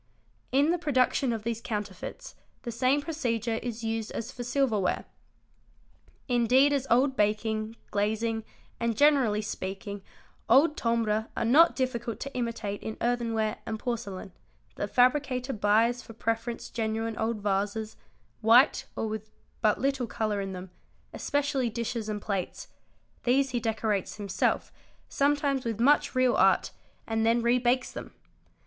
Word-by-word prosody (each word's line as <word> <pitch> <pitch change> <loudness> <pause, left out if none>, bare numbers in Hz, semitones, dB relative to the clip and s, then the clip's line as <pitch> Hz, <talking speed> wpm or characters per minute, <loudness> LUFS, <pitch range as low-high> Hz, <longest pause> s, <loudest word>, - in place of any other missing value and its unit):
In 280 +5 +4
the 350 - 0
production 260 -4 +2
of 225 -2 -3
these 230 0 -3
counterfeits 210 - -5 0.3
the 240 - -4
same 260 +5 +2
procedure 235 -8 -1
is 235 -1 -5
used 225 -1 -2
as 230 +3 -4
for 250 -2 -6
silverware. 240 -7 0 1.2
Indeed 255 +3 +4
as 275 -1 -1
old 260 +3 +3
baking, 215 +1 0 0.2
glazing, 220 +2 0 0.4
and 235 -2 -1
generally 265 -8 +4
speaking 195 0 -5 0.5
old 290 +6 +5
"timbre" 225 -2 0
are - - 0
not 300 +9 +6
difficult 240 -3 -2
to 275 - -5
imitate 230 -4 -3
in 220 - -5
earthenware 230 -3 0
and 220 - -2
porcelain, 210 -6 -4 0.4
the 205 - -2
fabricator 255 +2 +2
buys 220 +3 +2
for 225 - -12
preference 230 +1 -3
genuine 225 0 -2
old 220 0 -1
vases, 205 +2 -1 0.5
white 235 +6 +5
or - - -2
with 215 0 -5 0.3
but 215 -2 +3
little 270 -2 0
colour 215 -3 -1
in 195 -1 -4
them, 185 0 -8 0.4
especially 285 -4 0
dishes 230 -1 -3
and 210 -1 -4
plates; 195 -3 -3 0.5
these 265 +2 +2
he 240 - 0
decorates 220 -3 -1
himself, 200 -3 -1 0.4
sometimes 280 -1 +1
with 230 -2 -3
much 285 +3 +3
real 255 -1 +4
art, - - +3 0.3
and 225 0 0
then 230 +1 +3
rebakes 245 +1 +2
them. - - -8
230 Hz, 140 wpm, -28 LUFS, 215-255 Hz, 1.2 s, not